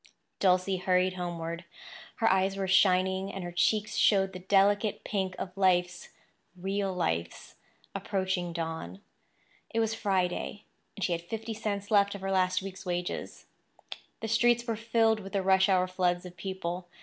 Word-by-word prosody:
Dulcie 185 0 +3
hurried 185 0 +2
homeward. 170 -1 -4 0.5
Her 225 - +3
eyes 190 +1 +1
were 195 -1 -1
shining, 190 +1 +3
and 195 - -6
her 175 - -5
cheeks 210 +5 +1
showed 195 -2 +3
the 185 - -6
delicate 205 +3 +2
pink 190 -3 -2
of 180 - -6
life's—real 185 +1 -1
life's—approaching 180 - -3
dawn. 160 - -5 0.7
It 225 - -1
was 225 -1 +1
Friday; 195 -1 -1 0.3
and 200 - -4
she 180 - +1
had 170 -1 -1
fifty 225 +5 -5
cents 205 -2 -4
left 200 -1 +4
of 200 - -8
her 195 0 -2
last 185 0 +2
week's 195 -1 -7
wages. 180 -1 -4 0.8
The 225 - -3
streets 240 +2 +3
were 230 -2 -1
filled 225 0 +2
with 195 0 -9
the 195 -1 0
rush 190 +1 +4
hour 185 -1 +4
floods 180 -1 0
of 180 0 -10
people. 180 -1 -4
190 Hz, 150 wpm, -29 LUFS, 180-200 Hz, 0.8 s, left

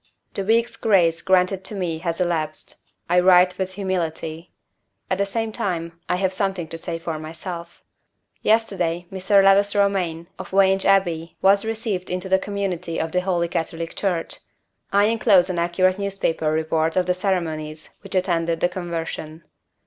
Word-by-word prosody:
The 195 - -2
week's 230 +3 +1
grace 175 -6 +3
granted 190 0 +2
to 210 - -3
me 175 -4 -2
has 170 0 -3
elapsed. 160 -4 -2 0.3
I 180 +1 +4
write 180 0 +5
with 190 0 -2
humility. 170 -3 -3 0.6
At 185 - +1
the 200 - +1
same 225 +2 -2
time 170 -5 -3
I 180 - +2
have 190 0 0
something 190 -3 -1
to 165 - -5
say 165 0 -4
for 165 -1 -4
myself. 170 +2 -8 0.6
Yesterday, 185 -6 +1
Mr. 195 +1 +3
Lewis 200 +1 +4
Romayne, 185 -5 +1
of - - -7
Vange 195 0 +3
Abbey, 175 -4 +1
was 200 +2 +5
received 220 -4 -3
into 180 +1 -3
the 190 0 +3
community 185 -4 -3
of 160 - -2
the 180 - +1
Holy 175 -2 0
Catholic 165 0 -4
Church. 180 -5 -1 0.5
I 200 +1 +4
inclose 210 -5 +4
an 175 - -2
accurate 185 +2 +2
newspaper 195 -6 -1
report 160 +1 0
of 185 -1 +2
the 180 - +2
ceremonies 160 -5 -3
which 195 -1 -6
attended 170 -3 +1
the 175 - +2
conversion. 165 -3 -5
180 Hz, 160 wpm, -22 LUFS, 165-195 Hz, 0.6 s, write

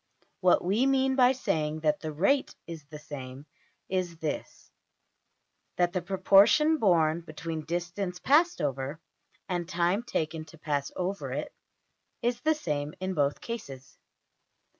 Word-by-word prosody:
What 185 -2 +4
we 210 +9 +2
mean 265 0 +2
by 255 -1 +5
saying 155 -11 -1
that 150 -1 +1
the 155 - -6
\emph{rate} 200 - +1
is 165 -3 -8
the 150 +1 -10
same, 140 -2 -8 0.4
is 180 -3 -2
this: 155 -2 -5 1.1
that 175 0 +2
the 185 - 0
proportion 195 - +5
borne 170 -6 +3
between 160 -1 -6
distance 175 +2 -3
passed 305 - +3
over 140 +1 -2 0.5
and 175 -2 -2
time 175 +3 +1
taken 160 -9 -3
to 160 +1 -15
pass 145 -3 -2
over 190 +2 -3
it, - - -4 0.7
is 240 0 0
the 315 +3 +3
same 150 - -3
in 185 0 -2
both 145 -3 0
cases. 135 - -8
175 Hz, 140 wpm, -29 LUFS, 155-200 Hz, 1.1 s, by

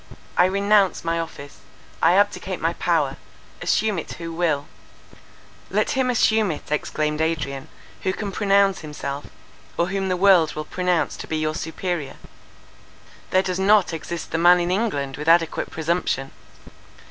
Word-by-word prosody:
"I 180 - +5
renounce 200 +1 +2
my 165 0 0
office, 145 -3 -7 0.4
I 165 - +5
abdicate 205 +1 +1
my - - 0
power—assume 215 -4 -1
it - - -7
who 165 0 -7
will!"— 160 -4 0 1.0
"Let - - +1
him 265 -2 +1
assume 220 -3 +3
it," 150 -2 -6
exclaimed 150 0 -1
Adrian, 150 -4 -2 0.3
"who 190 - 0
can 200 +1 -4
pronounce 200 -1 +3
himself, 145 -2 -6 0.5
or 170 +2 +1
whom 195 -1 -1
the 185 - 0
world 180 -4 +4
will 155 0 -4
pronounce 180 0 0
to - - -8
be 160 - -2
your 155 0 -1
superior. 160 -2 -4 1.1
There 185 0 +3
does 185 -1 -2
not 195 -2 +4
exist 165 +1 -5
the 165 - 0
man 175 +1 +6
in 175 0 -1
England 165 - -1
with 150 +2 -6
adequate 165 -1 +3
presumption. 160 -4 -1
175 Hz, 145 wpm, -23 LUFS, 155-195 Hz, 1.1 s, man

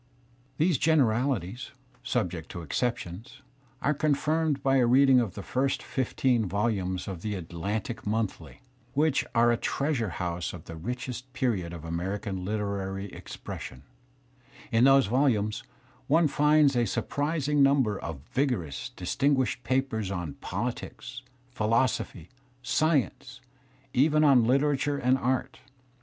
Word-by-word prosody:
These 160 -3 +2
generalities, 125 - +1 0.3
subjecl 90 -9 -3
exceptions, 115 - -3 0.4
are 150 - +3
confirmed 150 0 0
by 135 -1 +3
a 125 -2 +4
reading 130 +1 +6
of 110 -7 -2
the 100 - -6
first 135 +1 -1
fifteen 125 -3 0
volumes 95 -2 -1
of 95 -4 -5
the 105 +1 -3
Atlantic 100 +7 -4
Monthly 110 -1 -2
^ - - -32 0.3
which 150 0 +2
are 120 0 +5
a 120 - +2
treasure 135 -6 -1
house 85 -1 -3
of 85 -3 -10
the 85 - -8
richest 125 +7 -5
period 115 -10 -1
of 85 -2 -8
American 95 +3 -3
literary 100 -1 -3
expression* 65 - -8 0.9
In 115 +2 +4
those 135 0 +6
volumes 110 -4 +1 0.5
one 160 +2 +4
finds 150 -1 +4
a 120 -1 +3
surprising 145 +5 0
number 135 -7 +3
of 80 -5 -6
vigorous, 120 - -1
distin 140 +11 +1
guished 130 -1 -1
papers 120 -5 -1
on 90 -6 -4
politics, 130 0 -5 0.3
philosophy, 110 -6 0 0.3
science, 155 0 0 0.5
even 155 +3 +4
on 135 -6 +6
literature 140 +2 +2
and 130 0 +2
art. 130 +1 -1
120 Hz, 125 wpm, -28 LUFS, 100-135 Hz, 0.9 s, reading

